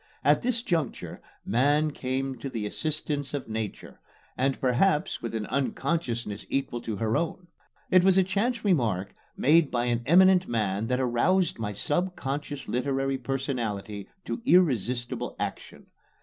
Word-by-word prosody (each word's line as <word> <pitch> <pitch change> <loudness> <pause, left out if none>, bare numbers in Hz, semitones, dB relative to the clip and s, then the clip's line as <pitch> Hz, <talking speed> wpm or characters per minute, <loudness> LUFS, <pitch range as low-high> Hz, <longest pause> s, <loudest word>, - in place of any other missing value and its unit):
At - - +4
this 240 -1 0
juncture 165 - -2 0.2
Man 145 +7 +2
came 135 0 -3
to 135 - -5
the 115 -5 -4
assistance 145 +3 -1
of 140 - -4
Nature, 110 -2 -5 0.4
and 135 +1 0
perhaps 145 +6 +1
with 115 -1 -4
an 110 -1 -2
unconsciousness 125 -5 -2
equal 135 -3 -2
to 110 -2 -4
her 110 +2 0
own. 170 +3 -2 0.4
It 185 -1 +6
was 190 0 +5
a 190 - +6
chance 210 +6 -1
remark 110 - +1 0.2
made 155 +2 +4
by 120 -1 0
an 120 -1 0
eminent 185 +2 +6
man 105 -2 -1
that 125 +1 0
aroused 135 +10 +2
my 110 -2 -2
subconscious 145 - -2
literary 135 +1 -1
personality 115 -6 -3 0.2
to - - -4
irresistible 125 - +1
action. - - -5
135 Hz, 140 wpm, -27 LUFS, 115-170 Hz, 0.4 s, It